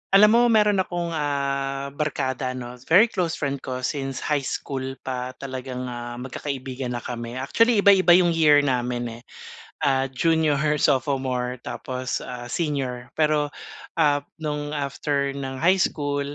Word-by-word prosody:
Alam 210 Hz, +2 st, +8 dB
mo, 235 Hz, -, +5 dB
mayroon 210 Hz, -3 st, +4 dB
akong, 175 Hz, -2 st, -2 dB
ah, 140 Hz, -2 st, -2 dB
barkada 135 Hz, -3 st, -2 dB
ano, 125 Hz, 0 st, -7 dB
very 210 Hz, +8 st, +6 dB
close 170 Hz, -3 st, -1 dB
friend 140 Hz, -1 st, -2 dB
ko 130 Hz, -1 st, -5 dB
since 135 Hz, -1 st, -3 dB
high 150 Hz, -1 st, +1 dB
school 135 Hz, 0 st, -4 dB
pa 130 Hz, 0 st, -4 dB
talagang, 130 Hz, -1 st, -6 dB
ah, 120 Hz, -1 st, -6 dB
magkakaibigan 130 Hz, 0 st, -5 dB
na 120 Hz, -, -5 dB
kami. 120 Hz, -1 st, -5 dB
Actually 205 Hz, -, +2 dB
iba-iba 190 Hz, -3 st, +7 dB
'yong 175 Hz, -1 st, +4 dB
year 150 Hz, -3 st, +5 dB
namin 120 Hz, -3 st, -1 dB
eh, -, -, -18 dB, 0.7 s
ah, 135 Hz, -1 st, +1 dB
junior, 155 Hz, +1 st, +2 dB
her 150 Hz, 0 st, +1 dB
sophomore, 130 Hz, -3 st, 0 dB
tapos, 130 Hz, 0 st, -4 dB
ah, 120 Hz, -1 st, -7 dB
senior. 135 Hz, -6 st, -2 dB
Pero, 150 Hz, -1 st, +1 dB, 0.4 s
ah, 150 Hz, -3 st, +3 dB, 0.2 s
no'ng 150 Hz, -1 st, -3 dB
after 140 Hz, 0 st, -1 dB
ng 135 Hz, -1 st, -5 dB
high 185 Hz, +3 st, +5 dB
school, 145 Hz, -4 st, -1 dB
140 Hz, 145 wpm, -24 LUFS, 130-155 Hz, 0.7 s, Alam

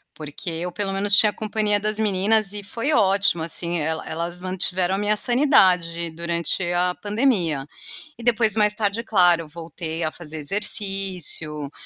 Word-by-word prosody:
Porque 155 Hz, +3 st, -5 dB
eu 170 Hz, +2 st, -4 dB
pelo 195 Hz, +1 st, -3 dB
menos 200 Hz, +1 st, +2 dB
tinha 210 Hz, -1 st, +6 dB
companhia 210 Hz, -1 st, -1 dB
das 215 Hz, +1 st, -1 dB
meninas 210 Hz, 0 st, +1 dB
e 205 Hz, -, -5 dB
foi 230 Hz, +9 st, -3 dB
ótimo 195 Hz, -, +2 dB
assim, 170 Hz, +1 st, -3 dB
ela 160 Hz, +1 st, -3 dB
elas 170 Hz, +2 st, -4 dB
mantiveram 185 Hz, 0 st, -2 dB
a -, -, -2 dB
minha 205 Hz, +1 st, +1 dB
sanidade 180 Hz, -, +3 dB
durante 170 Hz, +2 st, -3 dB
a 180 Hz, +1 st, +1 dB
pandemia. 205 Hz, -, 0 dB, 0.5 s
E 235 Hz, -, -11 dB
depois 225 Hz, -3 st, +2 dB
mais 210 Hz, -1 st, +2 dB
tarde 210 Hz, +1 st, -1 dB
claro, 175 Hz, -6 st, +3 dB
voltei 165 Hz, +1 st, -6 dB
a 155 Hz, -, -1 dB
fazer 160 Hz, -2 st, -6 dB
exercício, 185 Hz, -5 st, +1 dB
190 Hz, 150 wpm, -22 LUFS, 170-210 Hz, 0.5 s, tinha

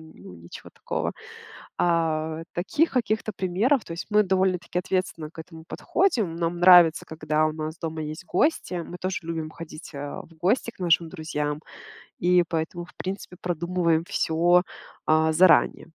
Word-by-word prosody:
ну, -, -, -12 dB
ничего 85 Hz, +1 st, -12 dB
такого. -, -, -3 dB, 0.7 s
Э, 160 Hz, -1 st, 0 dB
таких 290 Hz, -, +1 dB
каких-то 220 Hz, -3 st, -1 dB
примеров 205 Hz, +8 st, +1 dB
То 165 Hz, -, -8 dB
есть, 170 Hz, -, -6 dB
мы 210 Hz, 0 st, +5 dB
довольно-таки 185 Hz, -2 st, 0 dB
ответственно 180 Hz, -4 st, -2 dB
к -, -, -11 dB
этому 160 Hz, -1 st, -13 dB
подходим. 230 Hz, -, 0 dB
Нам 170 Hz, 0 st, -1 dB
нравится, 175 Hz, -2 st, +7 dB
когда 155 Hz, 0 st, 0 dB
у 155 Hz, -, +1 dB
нас 155 Hz, +1 st, -5 dB
дома 160 Hz, -1 st, -4 dB
есть 155 Hz, +4 st, -6 dB
гости. 240 Hz, -, +1 dB
Мы 175 Hz, +1 st, -5 dB
тоже 185 Hz, 0 st, -2 dB
любим 160 Hz, -1 st, -4 dB
ходить, 160 Hz, -1 st, -10 dB
э, 145 Hz, 0 st, -6 dB
в -, -, -18 dB
гости 230 Hz, +5 st, +1 dB
к 185 Hz, -, -8 dB
нашим 165 Hz, -1 st, +3 dB
друзьям 150 Hz, -3 st, -3 dB, 0.7 s
и 180 Hz, 0 st, +5 dB
поэтому, 165 Hz, +1 st, -3 dB
в -, -, -17 dB
принципе, 185 Hz, -1 st, -6 dB
продумываем 170 Hz, -1 st, 0 dB
всё, 175 Hz, +2 st, +2 dB, 0.5 s
э, 160 Hz, 0 st, +4 dB
заранее. 175 Hz, +2 st, +4 dB
170 Hz, 155 wpm, -25 LUFS, 160-185 Hz, 0.7 s, нравится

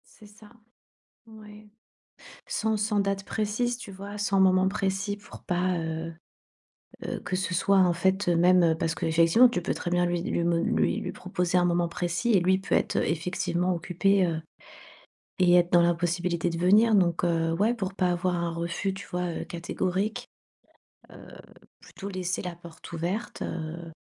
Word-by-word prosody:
C'est 215 Hz, -, -16 dB
ça, 210 Hz, 0 st, -17 dB, 0.8 s
ouais. 215 Hz, -1 st, -14 dB, 0.8 s
Sans 220 Hz, 0 st, 0 dB
sans 210 Hz, 0 st, 0 dB
date 195 Hz, 0 st, -1 dB
précise, 220 Hz, +3 st, -1 dB
tu 230 Hz, -4 st, -10 dB
vois? 200 Hz, +2 st, -8 dB
Sans 200 Hz, -1 st, +1 dB
moment 185 Hz, 0 st, +4 dB
précis 195 Hz, 0 st, -2 dB
pour 205 Hz, -, -14 dB
pas, 180 Hz, +1 st, 0 dB
heu 160 Hz, 0 st, -4 dB, 0.9 s
heu, -, -, -4 dB
que 180 Hz, +1 st, -3 dB
ce 185 Hz, 0 st, -2 dB
soit 195 Hz, +3 st, +2 dB
en 180 Hz, -2 st, +4 dB
fait, 190 Hz, +2 st, +1 dB
heu, 175 Hz, -, +3 dB
même, 180 Hz, +1 st, +5 dB
heu, 165 Hz, -1 st, +3 dB
parce 165 Hz, 0 st, -1 dB
qu'effectivement, 165 Hz, +10 st, +4 dB
tu 180 Hz, -, -2 dB
peux 170 Hz, -, -1 dB
très 175 Hz, -, -5 dB
bien 175 Hz, 0 st, +2 dB
lui 175 Hz, 0 st, -1 dB
lui 185 Hz, -5 st, -1 dB
mo 170 Hz, 0 st, +2 dB
lui 170 Hz, -, +1 dB
lui -, -, -5 dB
proposer 180 Hz, -1 st, -2 dB
un 175 Hz, -, +3 dB
moment 175 Hz, -1 st, +1 dB
précis 175 Hz, +7 st, -1 dB
et 200 Hz, -, +5 dB
lui 185 Hz, +2 st, +3 dB
il 190 Hz, -, -4 dB
peut -, -, -3 dB
être, -, -, 0 dB
heu, -, -, +2 dB
effectivement 180 Hz, +2 st, -1 dB
occupé, 185 Hz, +3 st, +1 dB
heu, 160 Hz, -1 st, -3 dB, 1.0 s
et 180 Hz, -1 st, +5 dB
être 175 Hz, 0 st, +3 dB
dans 175 Hz, -1 st, +6 dB
l'impossibilité 175 Hz, 0 st, 0 dB
de 165 Hz, -, -4 dB
venir. 210 Hz, +6 st, +4 dB
Donc, 175 Hz, -2 st, +2 dB
heu, 165 Hz, -1 st, +1 dB
ouais 215 Hz, +7 st, +2 dB
pour 195 Hz, -4 st, -4 dB
pas 180 Hz, -2 st, +1 dB
avoir 175 Hz, +1 st, 0 dB
un 170 Hz, 0 st, -1 dB
refus, 170 Hz, +3 st, -3 dB
tu 190 Hz, -2 st, -9 dB
vois? 180 Hz, 0 st, -2 dB
Heu, -, -, -4 dB
catégorique, 185 Hz, +4 st, -3 dB, 0.8 s
heu, -, -, -13 dB, 0.5 s
plutôt 200 Hz, -, -10 dB
laisser 185 Hz, -1 st, -3 dB
la 180 Hz, -2 st, -5 dB
porte 170 Hz, -1 st, -13 dB
ouverte, 175 Hz, +7 st, -4 dB
heu 165 Hz, 0 st, -5 dB
180 Hz, 180 wpm, -27 LUFS, 170-195 Hz, 1.0 s, dans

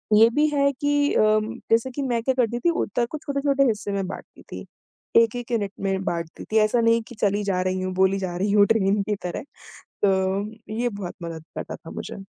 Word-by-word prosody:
ये 225 Hz, +2 st, +7 dB
भी 300 Hz, +1 st, +4 dB
है 280 Hz, 0 st, +3 dB
कि 290 Hz, 0 st, +2 dB
उम, 215 Hz, +1 st, +3 dB, 0.2 s
जैसे 230 Hz, +3 st, +3 dB
कि 280 Hz, +3 st, -4 dB
मैं 240 Hz, -3 st, 0 dB
क्या 265 Hz, -, +2 dB
करती 240 Hz, -1 st, +1 dB
थी, 345 Hz, -, +2 dB
उत्तर 245 Hz, -7 st, 0 dB
को 310 Hz, -, -3 dB
छोटे-छोटे 280 Hz, -1 st, +1 dB
हिस्से 210 Hz, -2 st, -2 dB
में 200 Hz, -1 st, -1 dB
बाँटती -, -, -9 dB
थी। -, -, -7 dB, 0.6 s
1-1 240 Hz, +2 st, -4 dB
यूनिट 205 Hz, -4 st, 0 dB
में 195 Hz, -1 st, -1 dB
बाँटती 170 Hz, -2 st, -4 dB
थी। 220 Hz, -, +3 dB
ऐसा 235 Hz, +2 st, +1 dB
नहीं 230 Hz, 0 st, +3 dB
की 240 Hz, -, -10 dB
चली 205 Hz, 0 st, +1 dB
जा 190 Hz, -2 st, 0 dB
रही 185 Hz, 0 st, -1 dB
हूँ, 185 Hz, 0 st, -2 dB
बोली 190 Hz, +1 st, +3 dB
जा 185 Hz, -2 st, -3 dB
रही 200 Hz, +2 st, 0 dB
हूँ 205 Hz, -1 st, +6 dB
ट्रेन 205 Hz, -2 st, +2 dB
की 210 Hz, +1 st, -1 dB
तरह, 175 Hz, -, -4 dB, 0.6 s
तो 200 Hz, +3 st, 0 dB
ये 245 Hz, -, +1 dB
बहुत 200 Hz, -5 st, -6 dB
मदद 165 Hz, -1 st, -6 dB
करता -, -, -5 dB
था 165 Hz, -, -12 dB
मुझे। 195 Hz, -, -7 dB
215 Hz, 215 wpm, -24 LUFS, 195-240 Hz, 0.6 s, ये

